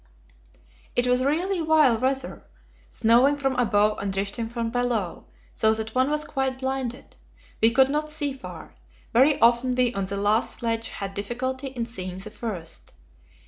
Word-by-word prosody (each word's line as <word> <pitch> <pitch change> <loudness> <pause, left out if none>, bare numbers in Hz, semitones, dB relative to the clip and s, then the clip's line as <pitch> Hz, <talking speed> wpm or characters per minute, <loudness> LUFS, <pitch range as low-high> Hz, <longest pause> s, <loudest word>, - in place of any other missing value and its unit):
It 245 - +3
was 250 +1 +2
really 345 +7 0
vile 310 -6 +4
weather, 265 +1 -2 0.5
snowing 245 +6 +4
from 270 -2 0
above 210 -3 +2
and 200 - -2
drifting 200 +4 -2
from 230 -1 -3
below, 240 -7 -1 0.3
so 220 0 +3
that 220 0 -5
one 255 +2 +2
was 300 0 -1
quite 265 -2 -2
blinded. 265 -2 -4 0.5
We 225 - +6
could 260 +3 +4
not 300 +2 -1
see 295 -2 -2
far; 265 - -10 0.4
very 270 +5 +5
often 240 +2 +4
we 250 -1 +2
on 195 -3 -2
the 200 +1 -4
last 205 +3 +1
sledge 230 -1 -2
had 195 -1 -5
difficulty 260 +6 -3
in 250 -3 -4
seeing 185 -6 -5
the 195 +3 -6
first. 185 -10 -5
245 Hz, 160 wpm, -25 LUFS, 220-265 Hz, 0.5 s, We